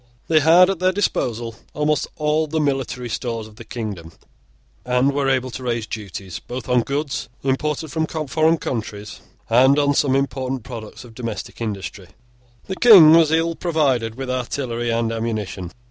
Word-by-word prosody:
They 160 -1 +5
had 165 +4 +6
at 190 - -4
their 185 0 +3
disposal 120 - -1 0.2
almost 150 0 0
all 155 +1 0
the 160 +1 -1
military 135 -4 -1
stores 115 -1 -4
of 110 -1 -17
the - - -9
kingdom, 100 -9 -6 0.7
and 125 +3 +2
were 140 -1 0
able 130 -1 0
to 130 - -7
raise 120 -3 -2
duties, 100 -4 -7
both 125 +1 -7
on 125 -1 +3
goods 140 0 -3
imported 150 +3 -1
from 160 +3 -1
foreign 155 +1 +1
countries, 105 -6 -5 0.3
and 130 +4 +5
on 145 -1 +3
some 135 -2 +2
important 135 -2 -2
products 115 -3 -9
of 120 -2 -14
domestic 115 -2 -6
industry. 100 -4 -5 0.6
The 190 - -5
King 190 -10 +9
was 165 -2 +5
ill 165 +1 +2
provided 140 -10 0
with 130 0 -4
artillery 125 -2 -3
and 115 0 0
ammunition. 110 -6 -4
130 Hz, 160 wpm, -21 LUFS, 115-150 Hz, 0.7 s, King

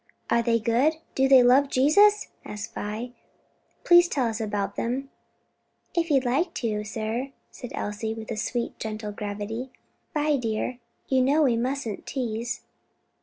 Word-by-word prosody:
"Are 235 - +4
they 230 0 +2
good? 240 +8 +2 0.2
do 265 0 +3
they 265 -2 +7
love 265 +3 +5
Jesus?" 405 +12 +4
asked 210 0 -7
Vi. 220 +4 -4 0.7
"Please 345 0 +7
tell 275 -6 0
us 225 -1 -2
about 200 -2 -2
them." 265 +4 -3 0.8
"If 335 -1 0
you 280 -3 +5
like 280 +8 0
to, 215 -3 -1
sir," 225 +5 -3 0.2
said 245 - -8
Elsie, 220 +2 -3
with 220 -1 -7
a - - -2
sweet 235 +2 -2
and - - -35
gentle 215 -1 -4
gravity. 210 +4 -5 0.5
"Vi, 300 -1 +2
dear, 235 +1 -2 0.3
you 265 -1 +3
know 285 +5 +3
we 250 -5 +3
mustn't 245 -2 -3
tease." 235 -2 -3
240 Hz, 155 wpm, -26 LUFS, 220-275 Hz, 0.8 s, they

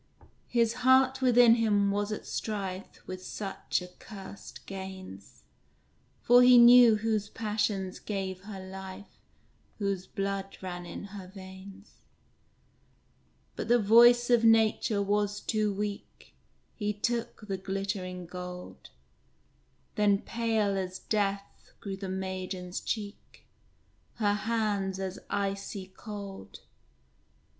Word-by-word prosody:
His 235 -2 +2
heart 260 +1 +4
within 245 -2 +6
him 205 -3 +2
was 205 +1 -1
at 215 - -5
strife 195 -3 -5
With 185 0 -7
such 195 -2 -3
accursed 195 +2 -11
gains; 190 - -9 0.8
For 245 +1 +7
he 250 0 +8
knew 240 -1 +9
whose 215 -1 -1
passions 210 -4 -2
gave 190 -2 -4
her 205 -2 -7
life, 190 +1 -10 0.6
Whose 195 -3 -2
blood 195 -1 -3
ran 175 -2 -6
in - - -7
her 195 -3 -8
veins. 190 +1 -12 1.6
But - - -4
the 240 +1 +5
voice 240 +3 +6
of 235 -1 +5
nature 220 -2 +3
was 205 0 0
too 215 -1 0
weak; 205 0 -6 0.4
He 210 -1 -2
took 230 +1 -3
the 195 -2 -2
glittering 190 -1 -4
gold! 180 +1 -9 1.0
Then 205 -1 +2
pale 220 -4 0
as 185 0 -4
death 200 -2 -3
grew 195 -2 -5
the 190 0 -6
maiden's 185 -1 -4
cheek, 205 -2 -6 0.7
Her 205 -3 +1
hands 205 -3 -1
as 190 0 -4
icy 195 -1 -3
cold. 200 -3 -9
200 Hz, 110 wpm, -29 LUFS, 190-220 Hz, 1.6 s, knew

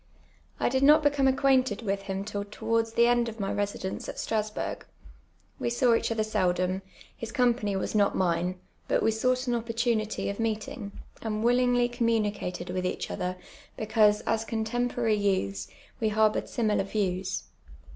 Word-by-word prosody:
I - - +2
did 260 +2 +1
not 300 +2 +6
become 285 -2 +3
acquainted 260 -4 +2
with 195 -2 -1
him 195 0 -4
till 205 -1 -3
towards 225 +2 -1
the 235 - +5
end 240 -1 +3
of 225 0 -10
my 195 -1 -1
residence 205 -2 -3
at - - -7
Strasburcf. 215 -1 -3 0.7
We - - 0
saw 240 0 +3
each 230 - +1
other 220 -1 +1
seldom, 185 -3 0 0.3
his 230 - -6
com])any 235 -5 +1
was - - -3
not 205 -2 +3
mine, 180 0 0 0.3
but - - +1
we 225 - +3
soup^ht 255 +3 +1
an 240 -2 0
op])ortunity 230 -1 -1
of 200 - -7
meetinjj:. 220 -1 -3 0.3
and 215 -1 -2
willint^ly 245 0 +3
communicated 210 -7 -1
with 185 0 -2
each 180 - -3
other, 180 0 -3 0.4
because, 215 -1 +3
as 225 0 0
cotemporarv 225 -1 0
youths, 100 - 0 0.3
we 220 - +1
harboured 215 0 +2
similar 215 -4 +1
vic>ws. 190 -2 -2
220 Hz, 155 wpm, -28 LUFS, 200-235 Hz, 0.7 s, not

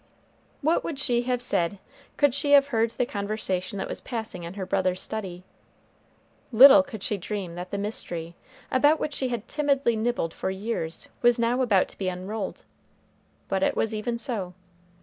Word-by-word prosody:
What 320 +4 +2
would 320 - -4
she 245 -4 +1
have 245 -1 0
said 190 -5 0 0.4
could 285 -3 +4
she 285 +1 +1
have 280 0 +6
heard 230 -3 +2
the 240 +2 -1
conversation 200 -3 -3
that - - -3
was - - -6
passing 220 -7 -5
in 170 +2 -7
her 195 -2 -4
brother's 185 -1 0
study? 185 -5 -5 1.1
Little 270 +5 +9
could 240 -8 -8
she 210 - -1
dream 195 -2 -5
that 180 +1 -7
the 200 - -3
mystery, 175 -5 -4 0.4
about 290 +4 +4
which 300 - -2
she 265 - -1
had 240 -2 -4
timidly 280 -5 +1
nibbled 220 -7 -1
for - - -3
years, 190 -4 -3
was 240 0 +5
now 235 +2 +1
about 205 -7 +3
to - - -15
be 190 -2 0
unrolled; 185 +4 -5 0.8
but 190 -1 -1
it - - +1
was 225 0 0
even 235 +2 -2
so. 215 -8 -4
220 Hz, 175 wpm, -26 LUFS, 190-250 Hz, 1.1 s, Little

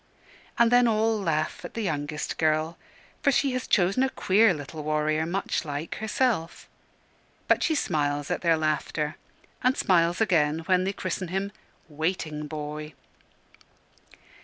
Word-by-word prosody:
And 235 0 +4
then 245 0 +6
all 220 0 +2
laugh 155 -4 -1
at - - -8
the 230 - -2
youngest 150 -4 -3
girl, 155 +1 +1 0.5
for 280 - +3
she 275 +1 +2
has 255 0 -3
chosen 195 +5 +3
a 265 - +3
queer 215 -2 +4
little 150 -1 -6
warrior, 155 +1 0
much 190 +3 -1
like 150 +1 -5
herself; 220 -6 -1 0.8
but - - +3
she 320 - +2
smiles 145 - -1
at 180 - -1
their 165 -2 +3
laughter, 155 0 -1 0.5
and 255 +1 +3
smiles 175 -1 +3
again 160 -7 +2
when 185 0 +2
they 195 - 0
christen 185 -1 -3
him 195 +3 -2 0.4
"Waiting 155 -1 -3
Boy." 150 -1 -6
165 Hz, 140 wpm, -26 LUFS, 155-205 Hz, 0.8 s, then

